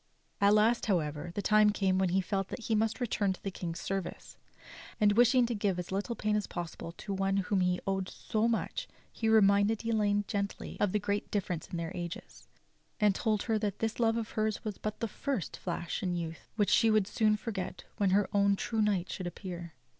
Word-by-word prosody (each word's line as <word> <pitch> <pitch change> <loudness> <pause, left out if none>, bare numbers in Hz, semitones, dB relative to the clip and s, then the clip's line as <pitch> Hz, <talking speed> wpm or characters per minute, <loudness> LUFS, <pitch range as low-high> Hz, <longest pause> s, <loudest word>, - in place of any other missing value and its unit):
At 200 +1 +6
last, 220 +3 +3
however, 155 -4 -1
the 205 - -2
time 215 0 +5
came 190 -2 +1
when 190 -1 +2
he 190 +2 +2
felt 195 +1 -2
that 235 - -6
he 225 - -1
must 220 +1 +1
return 205 -5 0
to - - -15
the 195 - -2
King's 170 -2 -5
service; 195 -1 -4 0.6
and 210 -2 +5
wishing 245 +3 +5
to 235 - -2
give 205 -4 0
as 180 0 -5
little 205 +5 -2
pain 215 -1 0
as 210 -2 -1
possible 170 -1 -6
to 200 +3 -6
one 195 0 0
to 195 - +2
whom 190 0 +1
he 180 0 +2
owed 190 -1 -1
so 220 +1 -1
much 235 - -1 0.3
he 225 - 0
reminded 210 +1 +4
Elaine 205 -2 +1
gently 200 0 -3
of 205 - +2
the 210 - +2
great 205 0 -2
difference 180 -5 -2
in 175 - -5
their 165 -1 -3
ages, 170 -1 -7 0.5
and 210 -2 +4
told 215 +1 0
her 225 -2 +1
that 205 -2 -2
this 225 +1 -2
love 225 -1 +3
of 230 -1 -3
hers 215 0 -1
was 210 -3 -4
but 215 0 -4
the 230 - 0
first 240 - -3
flash 170 -1 -3
in 180 -2 -1
youth 165 -1 -5
which 205 -2 +2
she 225 - +5
would 215 -2 +4
soon 215 +1 +2
forget 200 -4 -5
when 200 -2 +2
her 200 +2 +3
own 200 0 +4
true 220 +2 -1
knight 200 -4 +1
should 185 - -4
appear. 175 -3 -7
205 Hz, 215 wpm, -31 LUFS, 185-215 Hz, 0.6 s, At